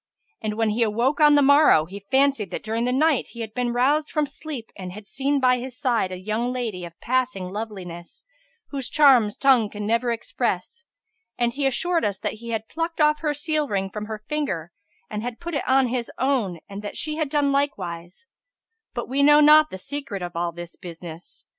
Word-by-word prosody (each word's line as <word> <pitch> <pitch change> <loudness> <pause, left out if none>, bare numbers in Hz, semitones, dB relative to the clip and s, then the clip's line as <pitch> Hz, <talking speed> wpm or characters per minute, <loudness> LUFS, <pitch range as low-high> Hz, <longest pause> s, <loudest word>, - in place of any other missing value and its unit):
And 215 -1 -2
when 225 -1 +1
he 225 +3 -1
awoke 235 +6 +1
on 295 -1 +7
the 290 - +5
morrow, 285 - +6
he 195 +5 -9
fancied 270 -6 +2
that - - -5
during 225 +2 -1
the 250 - +1
night 295 +2 +2
he 235 - -7
had 220 -1 -6
been 245 0 -1
roused 285 +5 +2
from 305 -1 0
sleep 280 -4 -8
and 185 -2 -7
had 210 +1 -10
seen 275 +7 0
by 255 -1 +3
his 250 0 -7
side 235 -8 +1
a 185 - -5
young 215 +6 -2
lady 230 -8 -3
of 170 -1 -12
passing 250 -7 -1
loveliness, 190 - -7 0.4
whose 270 -4 -3
charms 255 -9 +5
tongue 255 -6 +4
can 210 0 -6
never 230 +3 +1
express; 465 - -3 0.5
and 240 -1 +1
he 275 +1 0
assured 340 +6 +1
us 200 -1 0
that - - -3
he 235 - -8
had 220 -1 -3
plucked 330 +1 -4
off 300 0 +4
her 300 -2 -1
seal 305 0 -1
ring 195 -4 -2
from 210 +1 -5
her 215 -1 -7
finger 190 - -2 0.4
and 210 0 -4
had 240 0 -5
put 345 0 -6
it 285 - -2
on 265 0 +4
his 240 -1 -3
own 245 -10 0
and 200 0 -7
that 205 - -6
she 305 0 -2
had 310 -3 -1
done 285 -1 +2
likewise; 180 - -3 0.7
but 240 - -3
we 270 +3 0
know 295 +1 +7
not 305 +1 +7
the - - -7
secret 235 -3 -5
of 175 0 -6
all 170 0 -1
this 175 0 -9
business. 170 -1 -10
240 Hz, 210 wpm, -24 LUFS, 205-285 Hz, 0.7 s, on